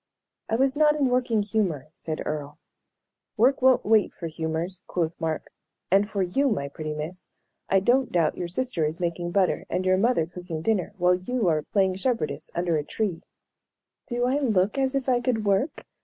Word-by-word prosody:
"I 225 - +1
was 265 +2 +2
not 300 0 +4
in 280 -3 +2
working 245 -4 +1
humor," 195 -10 -1
said 155 0 -5
Earle. 150 -1 -4 0.8
"Work 255 +5 +3
won't 260 0 +4
wait 215 -1 +3
for 170 - -7
humors," 165 +3 -3
quoth 165 -2 -2
Mark. 160 -1 -3 0.4
"And 200 +2 +4
for 200 -3 0
you, 270 +11 +1
my 140 - -1
pretty 155 +1 -5
miss, 160 +5 -6 0.4
I 195 0 +4
don't 255 +5 +2
doubt 165 -3 +2
your 175 - -3
sister 185 -1 -1
is 155 +2 -1
making 175 0 -2
butter 185 0 +1
and 185 - -1
your 185 0 +4
mother 220 -5 +2
cooking 170 -2 -7
dinner, 205 -2 0
while 180 0 +4
you 195 +4 -1
are 155 -2 +2
playing 190 +2 +1
shepherdess 230 -7 -2
under 170 -2 +1
a 150 - -1
tree." 180 0 -2 0.9
"Do 245 -1 0
I 265 +3 +1
look 210 -7 +2
as 265 0 +1
if 275 -1 -1
I 250 -2 +3
could 235 -3 0
work?" 200 +10 0
190 Hz, 185 wpm, -26 LUFS, 165-245 Hz, 0.9 s, not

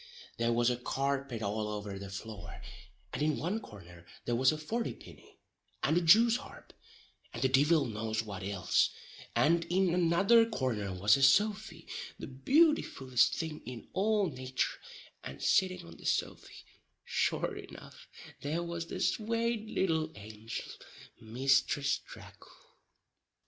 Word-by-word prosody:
There 115 0 +1
was 120 +1 +3
a 120 - -1
carpet 135 -2 -2
all 105 +1 -2
over 105 -2 -5
the 100 0 -7
floor, 95 -3 -8 0.5
and - - -3
in 150 0 +1
one 185 +8 -2
corner 90 - -13 0.2
there 120 - 0
was 130 +3 +4
a 155 - -3
forty 225 +10 -3
pinny - - -16 0.5
and 155 - +2
a 175 - +3
Jew's 225 +8 +6
harp 255 - -13 0.6
and 115 - -5
the - - +5
divil 145 +3 +4
knows 110 -1 -2
what 100 -3 -7
ilse, 100 -2 +1 0.5
and 170 +2 +3
in 180 0 +1
another 180 +6 +5
corner 115 - -2
was 100 +6 +4
a - - -3
sofy, 205 +10 +3 0.3
the - - -7
beautifullest 135 - +2
thing 160 -2 -4
in 125 -2 -9
all 210 0 +2
natur, 130 -3 -3 0.4
and 70 - -8
sitting 185 - +2
on 85 0 -12
the - - -14
sofy, - - -2 0.4
sure - - 0
enough, - - -11 0.3
there 155 +4 -2
was 170 -1 -5
the - - -5
swate 230 0 0
little 160 -6 0
angel, 110 +2 -7 0.5
Misthress 135 +4 +1
Tracle. - - -14
135 Hz, 140 wpm, -32 LUFS, 110-175 Hz, 0.6 s, Jew's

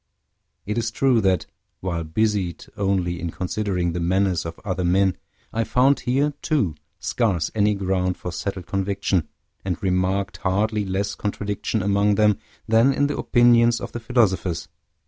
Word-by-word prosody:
It 105 +3 -1
is 115 -1 -1
true 120 0 +2
that, 95 -2 +2 0.3
while 85 -3 -2
busied 95 +1 -1
only 95 -3 0
in 85 - -3
considering 90 -1 -2
the 90 - -2
manners 90 0 +1
of 80 - -8
other 95 -2 -1
men, 95 +1 +3 0.4
I 115 - +1
found 130 +4 +3
here, 140 +4 +1
too, 140 - +1 0.2
scarce 95 -10 0
any 105 -1 +2
ground 95 -2 0
for 90 - -5
settled 95 +1 -4
conviction, 95 -4 -1 0.4
and 90 -3 -2
remarked 95 -1 0
hardly 105 +3 0
less 95 +1 -1
contradiction 105 0 -2
among 100 +1 +2
them 105 -1 +3 0.3
than 115 +4 +5
in 145 - +2
the 145 - -2
opinions 120 -1 +4
of - - -6
the 120 - -5
philosophers. 100 -7 0
100 Hz, 150 wpm, -23 LUFS, 90-110 Hz, 0.4 s, than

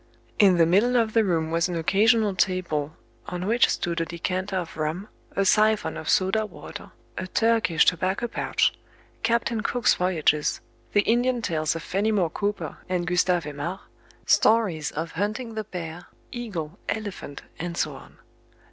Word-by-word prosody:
In 195 -4 +6
the 165 - +6
middle 205 +9 +3
of 225 -2 +1
the 225 - +4
room 165 -5 0
was 170 +2 +1
an 175 - -3
occasional 210 +5 +3
table, 175 -5 -1 0.3
on 180 0 -4
which 235 +4 +3
stood 170 -1 -1
a - - 0
decanter 185 +4 -3
of 175 -3 -3
rum, 155 +6 -3 0.3
a 195 - +2
siphon 215 +2 +3
of - - -5
soda 195 +3 +2
water, - - -10 0.3
a 185 - -4
Turkish 225 -7 +3
tobacco 185 +6 +1
pouch, - - +1 0.5
"Captain 230 -1 +1
Cook's 240 +2 +2
Voyages," 160 -4 +1 0.3
the 205 - +5
Indian 240 +2 +1
tales 155 -3 0
of 165 - -5
Fenimore 195 -3 0
Cooper 205 +2 -3
and 180 -1 0
Gustave 180 -1 +1
Aimard, 150 +6 -5 0.4
stories 200 -9 +3
of 165 +2 -4
hunting 215 +6 -3
the 215 -1 -4
bear, 175 -2 -7 0.2
eagle, 195 -8 -5
elephant, 205 -9 -5 0.2
and 170 0 -4
so - - 0
on. - - -14
185 Hz, 155 wpm, -25 LUFS, 170-215 Hz, 0.5 s, In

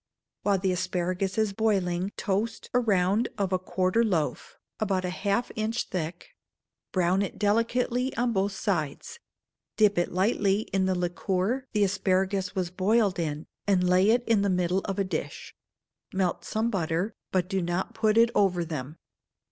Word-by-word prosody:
While 200 -1 +2
the 190 0 0
asparagus 185 +1 -1
is 215 -2 +1
boiling, 195 -3 0
toast 205 +4 -2
a 250 - +4
round 205 -1 +2
of 195 -2 -1
a - - +4
a - - -14
quartern 185 +5 +1
loaf, 160 -6 -2 0.2
about 195 -3 0
half 200 +5 -1
an - - -17
inch 220 +2 -1
thick; 175 -1 -4 0.6
brown 185 +1 +2
it 200 - -3
delicately 235 +4 +1
on 240 -1 +1
both 195 0 +1
sides; 190 - -3 0.6
dip 205 -4 +4
it 175 - 0
lightly 195 +1 +2
in 190 -1 +2
the 190 - +1
liquor 185 +8 -1
the 210 -2 +3
asparagus 190 -1 0
was 180 -2 -1
boiled 200 +1 +2
in, 155 -2 -3 0.2
and 185 -3 +3
lay 185 +3 +4
it 240 +2 +3
in 225 -3 +3
the 200 - +1
middle 180 0 +1
of 195 -2 -3
a 200 - +2
dish; 185 - -5 0.6
melt 190 -2 -1
some 225 +2 -1
butter, 175 +2 -1 0.2
but 185 -2 +1
do 195 -1 -1
not 175 +2 -2
put 220 -1 +2
it 230 0 +5
over 180 -4 +2
them. 155 -1 -6
195 Hz, 165 wpm, -27 LUFS, 180-215 Hz, 0.6 s, it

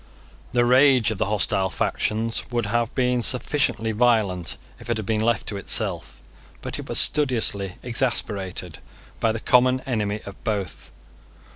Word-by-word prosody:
The 120 0 +2
rage 130 -2 +4
of 105 - -5
the - - 0
hostile 95 -2 +1
factions 110 +4 -2
would 120 -2 -1
have 115 +2 -1
been 125 -1 +1
sufficiently 125 -3 0
violent, 105 -7 +1 0.2
if - - -12
it 120 - 0
had 110 - -5
been 110 +1 0
left 115 -1 0
to 100 - -5
itself. 60 -9 -2 0.4
But - - -5
it - - -9
was - - -1
studiously 115 -9 +2
exasperated 105 - -1 0.4
by 115 - +2
the 110 - -4
common 125 +2 +3
enemy 105 -5 -2
of 100 - -11
both. 105 -5 -4
110 Hz, 150 wpm, -23 LUFS, 100-125 Hz, 0.4 s, rage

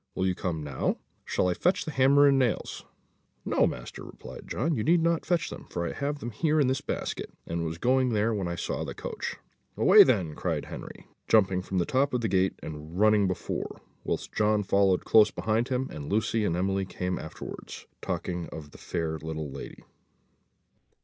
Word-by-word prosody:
Will 95 - 0
you 95 - +2
come 85 -4 -3
now? 70 -3 -1 0.3
Shall - - +1
I 90 - +2
fetch 180 - +1
the 155 - -3
hammer 140 +1 +5
and 135 -1 +4
nails?" 125 -4 -1 0.6
"No, - - +3
master," - - -6
returned - - -11
John, 160 +8 0
"you 110 -7 -1
need 170 +1 +4
not 170 -1 +1
fetch 170 -1 +1
them, - - -9
for 85 0 -2
I - - -3
have 145 +1 -2
them 120 -4 -6
here 155 +7 +1
in 145 - +4
this 130 +1 0
basket, - - -4 0.2
and 85 0 -2
was 80 -1 -2
just 85 - -17
going 130 +1 +3
when 105 -3 0
I 85 - -2
saw - - -3
the - - -6
coach." - - -5 0.4
"Away - - +8
then," 80 -5 +1
cried - - -2
Henry, - - -9 0.2
jumping 95 -4 +4
from 95 +1 -4
the 90 - +2
top 135 0 +1
of 125 - 0
the 115 - 0
gate, 95 -2 +1
and 80 +3 -7
running 105 -2 +5
before, 95 - -4 0.2
whilst - - -3
John 105 -1 +2
followed 95 -1 +2
close 110 -1 +6
behind 110 +4 0
him, 130 0 -1
and 75 +1 -6
Lucy 110 +1 +1
and 85 -3 0
Emily 95 +1 0
came 90 0 -3
afterwards, 80 - -8 0.2
talking 90 -2 -3
of 75 -2 -9
the - - -14
fair 80 -1 -3
little 80 -2 -5
lady. 70 - -9
100 Hz, 195 wpm, -28 LUFS, 85-130 Hz, 0.6 s, Away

